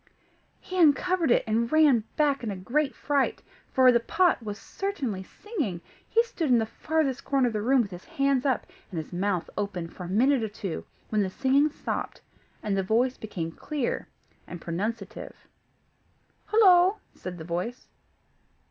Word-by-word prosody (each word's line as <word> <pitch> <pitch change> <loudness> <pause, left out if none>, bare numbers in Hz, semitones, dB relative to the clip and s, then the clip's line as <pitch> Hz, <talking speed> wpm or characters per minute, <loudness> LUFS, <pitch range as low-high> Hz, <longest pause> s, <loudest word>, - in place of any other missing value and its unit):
He 370 0 -5
uncovered 335 +2 +4
it, - - +4
and 230 +1 0
ran 300 -8 +5
back 285 -4 +2
in 225 - -2
a 200 - -3
great 270 +10 -1
fright, 285 -2 0 0.3
for 255 -1 +6
the 235 - +4
pot 345 +7 +2
was 210 -2 -5
certainly 270 - -4
singing! 280 - -4 0.3
He 460 - +4
stood 335 - -3
in 245 - +6
the 225 - +1
farthest 290 +1 -1
corner 275 -2 +2
of 240 - 0
the 210 - -1
room, 255 +3 +4
with 200 - -8
his 180 0 -9
hands 275 -2 +1
up, 265 -3 +1 0.2
and 180 - -6
his 160 +2 -5
mouth 185 -1 -1
open, 200 -5 -3
for 180 - -8
a - - -7
minute 255 +7 +3
or 220 - -2
two, 195 -5 -5 0.2
when 215 -1 +1
the 190 - 0
singing 275 +9 +3
stopped, 300 - -4 0.4
and 205 -2 0
the 195 - +2
voice 235 +7 +1
became 175 -6 -5
clear 280 - -3 0.4
and 175 - -7
pronunciative. 200 +5 -4 1.1
"Hollo!" 380 -2 +6 0.2
said 180 -1 -7
the 160 - -7
voice. 180 +9 -4
240 Hz, 170 wpm, -27 LUFS, 200-290 Hz, 1.1 s, for